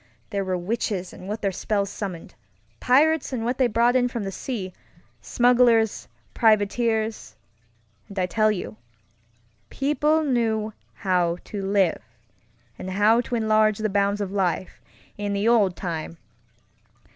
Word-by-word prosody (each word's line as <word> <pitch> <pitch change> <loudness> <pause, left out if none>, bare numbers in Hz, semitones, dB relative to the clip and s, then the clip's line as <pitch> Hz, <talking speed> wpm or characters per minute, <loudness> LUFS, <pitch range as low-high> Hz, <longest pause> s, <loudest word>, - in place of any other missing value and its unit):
There 200 -2 -1
were 185 -1 -1
witches 190 -1 -3
and 185 - -11
what 210 +2 -5
their 195 - +1
spells 200 +1 -2
summoned; 185 -6 -6 0.5
pirates 300 +4 +3
and 235 -3 -3
what 250 +2 -2
they 255 - +4
brought 235 +2 +2
in 250 -1 +3
from 235 -3 -4
the 195 - -4
sea; 195 -4 -5 0.5
smugglers; 240 -3 +3 0.3
privateersŌĆöand 220 - +1 0.8
I 185 - +2
tell 215 +4 +2
you, 110 - -5 0.9
people 300 +3 +1
knew 225 -5 0 0.2
how 180 -3 0
to 205 - -6
live, 195 -3 +1 0.8
and 185 - -6
how 210 +5 +3
to 245 - -4
enlarge 215 -2 +2
the 215 0 -1
bounds 200 +1 +1
of 195 -2 -3
life, 185 -2 -2 0.4
in 205 -1 -2
the 200 +2 0
old 210 -6 +3
times! 165 -2 -5
215 Hz, 135 wpm, -24 LUFS, 195-235 Hz, 0.9 s, they